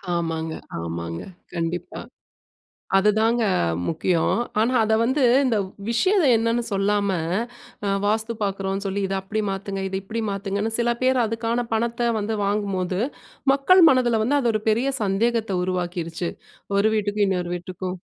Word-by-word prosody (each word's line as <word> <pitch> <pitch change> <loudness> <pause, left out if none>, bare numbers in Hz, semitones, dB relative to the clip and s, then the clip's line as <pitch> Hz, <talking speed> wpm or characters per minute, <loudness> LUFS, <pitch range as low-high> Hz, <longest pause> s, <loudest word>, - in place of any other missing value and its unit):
ஆமாங்க. 165 -1 -2 0.3
ஆமாங்க. 85 0 -4 0.3
கண்டிப்பா. 170 +1 -3 1.0
அதுதாங்க 220 +4 +3 0.4
முக்கியம். 165 +1 +1 0.2
ஆனா, 235 +4 +2
அத 220 0 +1
வந்து 260 +3 +1 0.2
இந்த 230 -4 +2 0.3
விஷயத்த 370 - +3
என்னன்னு 230 +1 0
சொல்லாம, 200 +1 +1 0.8
அ - - +1 0.2
வாஸ்து 220 +2 0
பாக்குறோம்ன்னு 195 0 -2
சொல்லி, 200 +1 -2
இத 195 - -2
அப்படி 215 +3 -2
மாத்துங்க, 195 0 -4
இத 190 - -4
இப்படி 225 +3 -4
மாத்துங்கன்னு 200 +2 -2
சில 235 0 +2
பேர் 255 -1 +3
அதுக்கான 230 +2 -1
பணத்த 235 +1 0
வந்து 215 +2 -2
வாங்கும்போது, 195 -3 -1 0.5
மக்கள் 350 +7 +5
மனதுல 240 -4 +2
வந்து, 285 +5 +2
அது 240 -4 +1
ஒரு 215 - 0
பெரிய 255 +5 +1
சந்தேகத்த 220 +2 0
உருவாக்கிடுச்சு. 175 -2 -2 0.5
ஒரு 205 +2 +4
வீட்டுக்கும் 205 0 +1
இன்னொரு 180 -2 -1
வீட்டுக்கும். 180 +1 -5
205 Hz, 135 wpm, -23 LUFS, 185-230 Hz, 1.0 s, மக்கள்